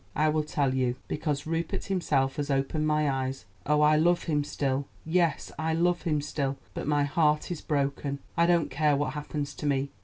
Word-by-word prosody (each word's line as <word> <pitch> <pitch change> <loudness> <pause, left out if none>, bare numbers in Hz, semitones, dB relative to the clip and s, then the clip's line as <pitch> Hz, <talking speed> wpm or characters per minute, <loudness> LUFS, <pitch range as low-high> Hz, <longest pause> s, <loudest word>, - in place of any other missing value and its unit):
"I 155 +1 +3
will 155 0 +2
tell 145 -3 0
you. 125 -2 +1
Because 145 -2 -2
Rupert 165 +1 -2
himself 140 -8 0
has 145 0 -2
opened 140 +3 0
my 150 0 +2
eyes. 135 -1 -2 0.2
Oh, 150 0 +3
I 150 0 +5
love 175 +2 +3
him 150 -3 0
still; 140 -1 -1 0.2
yes, 165 -2 +1
I 160 0 0
love 175 +1 +2
him 155 -4 0
still; 140 -2 -2 0.2
but - - -5
my 145 -1 +3
heart 150 +2 +1
is 170 - -4
broken. 140 -1 -1 0.2
I 170 0 +4
don't 170 -3 +2
care 150 -1 +2
what 145 +1 -1
happens 150 -1 -4
to 150 - -4
me. 140 0 0
150 Hz, 195 wpm, -28 LUFS, 140-160 Hz, 0.2 s, I